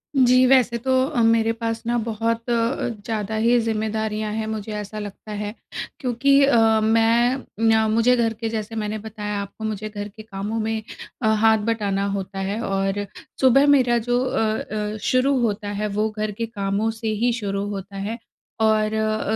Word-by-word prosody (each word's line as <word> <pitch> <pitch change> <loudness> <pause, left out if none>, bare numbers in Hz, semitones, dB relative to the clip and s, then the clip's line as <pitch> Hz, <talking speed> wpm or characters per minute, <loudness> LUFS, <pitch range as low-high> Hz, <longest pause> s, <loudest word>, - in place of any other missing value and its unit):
जी, 255 -1 +5
वैसे 250 -2 +4
तो 260 +3 -2 0.2
अ, 240 - 0
मेरे 225 0 +3
पास 230 0 -3
ना 240 +1 +1
बहुत 230 +1 -2
अ, 235 +2 0 0.2
ज़्यादा 220 -1 -2
ही 230 +3 +3
ज़िम्मेदारियाँ 220 -1 -2
हैं 220 0 -2
मुझे 220 -1 -4
ऐसा 210 0 -5
लगता 205 +1 -8
है। 210 0 -4 0.5
क्योंकि 275 +2 +3
अ, 275 -3 +4 0.3
मैं 230 +4 +3 0.2
न 225 -1 +4
मुझे 230 +3 +4
घर 230 -2 +1
के 225 +1 -4
जैसे 220 0 -4
मैंने 215 0 -2
बताया 210 -1 -5
आपको 200 +2 -9
मुझे 215 0 -3
घर 205 -1 -6
के 215 +1 -12
कामों 210 +1 -4
में 220 0 -1 0.4
अ, 220 - +1
हाथ 220 0 +4
बटाना 200 -3 0
होता 195 0 -5
है 195 +3 -2
और 195 -1 -1 0.4
सुबह 270 +2 +5
मेरा 255 -4 +4
जो 245 +1 +2
अ 260 - -1 0.6
अ, - - -5
शुरू 260 +4 +2
होता 210 -2 -1
है 210 - 0
वो 210 +2 0
घर 215 0 -3
के 230 +3 -3
कामों 205 -1 -1
से 225 0 -6
ही 220 +3 +1
शुरू 200 -4 -2
होता 200 0 -6
है। 210 +4 -3 0.4
और 215 -1 +3
अ, 215 0 0
220 Hz, 180 wpm, -22 LUFS, 210-230 Hz, 0.6 s, जी